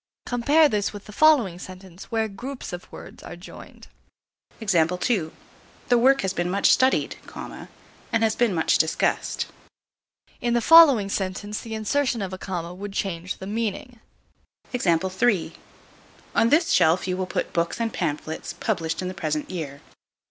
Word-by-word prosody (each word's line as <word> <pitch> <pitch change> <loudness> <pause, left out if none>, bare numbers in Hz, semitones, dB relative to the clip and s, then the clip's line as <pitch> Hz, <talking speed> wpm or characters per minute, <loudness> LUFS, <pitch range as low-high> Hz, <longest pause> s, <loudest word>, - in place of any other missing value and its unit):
Compare 285 +6 +4
this 210 -6 -1
with 205 -1 -10
the - - -11
following 235 - +4
sentence, 185 -1 -11
where 225 -1 -1
groups 245 +3 -7
of 175 - -8
words - - -11
are - - -9
joined. - - -13 0.7
The 180 -1 +1 0.7
work 260 +3 +4
has 190 -1 -1
been 175 -1 -1
much 200 +2 +3
studied, 260 +1 +2 0.9
and 225 -1 +1
has 220 -1 +2
been 240 -3 +2
much 160 - +2
discussed. 160 - 0 1.0
In 240 0 +1
the - - +4
following 280 -6 +7
sentence 200 +2 -3
the 225 -2 -6
insertion 235 +1 0
of 190 -1 -5
a 185 - -6
comma 175 -2 -5
would 200 +2 -7
change 180 -2 -3
the 190 - -8
meaning. 225 +3 -4 0.7
On 190 +2 -1
this 330 +5 +3
shelf 165 +4 +3
you 185 - -1
will 185 0 -3
put - - -3
books 170 +4 -1
and 230 -2 -1
pamphlets 155 +2 -3
published 165 -5 -2
in - - -3
the 185 - -4
present 155 -2 -3
year. 145 -6 -6
195 Hz, 150 wpm, -24 LUFS, 180-235 Hz, 1.0 s, following